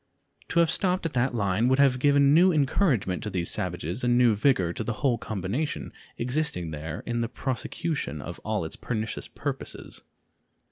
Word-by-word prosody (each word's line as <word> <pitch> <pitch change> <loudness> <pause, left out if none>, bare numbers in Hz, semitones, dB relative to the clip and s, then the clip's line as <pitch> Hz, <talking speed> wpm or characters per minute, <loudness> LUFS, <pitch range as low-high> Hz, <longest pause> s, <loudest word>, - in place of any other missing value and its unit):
To 170 - +1
have 165 - +3
stopped 185 -2 +1
at 165 - -2
that 125 0 +1
line 100 +1 +1
would 130 +1 +3
have 135 -2 +4
given 140 +1 +5
new 180 +4 +6
encouragement 135 - +1
to 105 - -3
these 90 -4 -2
savages 85 - -3
and 120 0 +3
new 120 -2 +5
vigor 105 -6 +2
to - - -3
the 120 - -2
whole 120 -3 +3
combination 110 - -3 0.2
existing 120 - -1
there 75 0 -5
in 120 0 -1
the 115 - -1
prosecution 130 - -3
of 85 +4 -7
all 105 -5 -2
its 80 - -6
pernicious 110 -2 -4
purposes. - - -6
120 Hz, 175 wpm, -27 LUFS, 95-140 Hz, 0.2 s, new